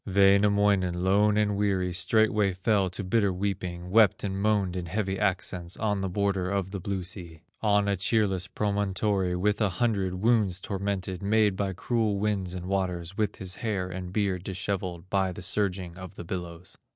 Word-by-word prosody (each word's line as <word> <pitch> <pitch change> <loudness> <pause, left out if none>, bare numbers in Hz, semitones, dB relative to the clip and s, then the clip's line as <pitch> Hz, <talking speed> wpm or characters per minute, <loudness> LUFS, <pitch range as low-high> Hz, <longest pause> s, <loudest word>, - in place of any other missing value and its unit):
Wainamoinen, 100 -2 +3
lone 105 +2 +3
and 105 -1 +2
weary, 95 -3 0
Straightway 105 +2 +2
fell 95 +1 +1
to 95 +3 -5
bitter 100 +1 +2
weeping, 90 -2 -3
Wept 110 -3 +4
and 95 -2 -2
moaned 100 -4 +1
in 90 -2 -4
heavy 95 +1 -2
accents, 95 -3 -1
On 105 -3 0
the 95 - -2
border 95 -1 0
of 95 -1 -1
the 100 - -4
blue 95 0 -3
sea, 85 -3 -8 0.2
On 105 -1 +3
a 100 - +2
cheerless 95 -1 +1
promontory, 100 -2 0
With 105 +4 0
a 105 - +3
hundred 95 -1 0
wounds 105 -2 +2
tormented, 95 -2 -3
Made 105 0 +3
by 100 -1 -1
cruel 110 +2 0
winds 100 -3 -1
and 90 -1 -6
waters, 90 -2 -2
With 105 -1 -1
his 95 -1 -5
hair 100 -6 -2
and 90 0 -6
beard 95 -3 -1
dishevelled 95 -2 -4
By 95 -1 +1
the 90 - -8
surging 95 -3 -1
of 95 +1 -9
the - - -7
billows. 85 0 -7
95 Hz, 175 wpm, -27 LUFS, 90-105 Hz, 0.2 s, Wept